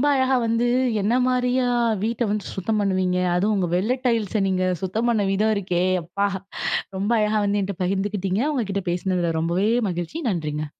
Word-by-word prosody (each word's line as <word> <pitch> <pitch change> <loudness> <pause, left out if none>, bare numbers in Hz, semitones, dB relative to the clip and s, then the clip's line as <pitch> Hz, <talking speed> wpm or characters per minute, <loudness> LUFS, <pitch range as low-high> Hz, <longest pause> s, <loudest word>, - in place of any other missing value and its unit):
ரொம்ப 285 - +1
அழகா 260 0 +2
வந்து 230 +1 +1 0.3
என்ன 210 +5 +1
மாரியா 250 0 +1 0.4
வீட்ட 230 +2 -1
வந்து 210 -1 -2
சுத்தம் 210 +3 -1
பண்ணுவீங்க? 185 -2 +1 0.2
அதுவும் 205 +4 +2
உங்க 185 - +1
வெள்ள 200 +8 +1
டைல்ஸ 220 -4 +1
நீங்க 185 -1 0 0.2
சுத்தம் 220 +6 -1
பண்ண 215 -3 +1
விதம் 215 +3 +2
இருக்கே, 180 -3 -1 0.2
அப்பா! 200 +5 -1 0.7
ரொம்ப 200 +4 -1
அழகா 215 0 +2
வந்து 205 0 +1
என்ட்ட 195 0 -4
பகிர்ந்துக்கிட்டீங்க 195 +1 -1
உங்க 255 - 0
கிட்ட 200 0 -2
பேசுனதுல 175 -2 -1
ரொம்பவே 175 +5 +1 0.2
மகிழ்ச்சி 175 - -4
நன்றிங்க. 155 -4 -2
200 Hz, 165 wpm, -23 LUFS, 185-220 Hz, 0.7 s, அழகா